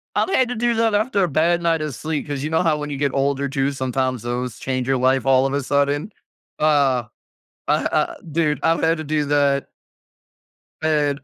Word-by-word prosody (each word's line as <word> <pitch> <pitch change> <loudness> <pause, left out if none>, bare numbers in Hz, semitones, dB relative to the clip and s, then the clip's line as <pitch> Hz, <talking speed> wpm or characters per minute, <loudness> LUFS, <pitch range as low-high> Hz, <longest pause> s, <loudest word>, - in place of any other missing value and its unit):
I've - - +1
had 260 -9 +2
to 245 - -3
do 240 +1 +1
that 225 -1 +2
after 210 -2 +1
a - - +2
bad 170 +3 +1
night 165 -2 +1
of 155 -2 -3
sleep. 155 +1 -4
'Cause 145 -2 -4
you 155 - -2
know 160 +2 +1
how 160 -3 +2
when 150 0 -5
you 145 - -4
get 140 0 0
older, 140 0 0
too, 135 0 -1
sometimes 130 -2 -2
those 120 0 -3
change 130 -1 -2
your 135 -1 +2
life 130 +1 +2
all 135 0 +4
of 135 - -1
a 140 - 0
sudden? 145 - 0 0.5
Uh, 140 -5 +2 0.6
uh, - - +2
uh - - 0 0.2
dude, 150 -3 +1
I've 165 0 +2
had 165 +1 +2
to 155 - -5
do 150 0 -1
that. 140 -1 +1 1.1
And 150 -3 +1
145 Hz, 210 wpm, -21 LUFS, 135-160 Hz, 1.1 s, all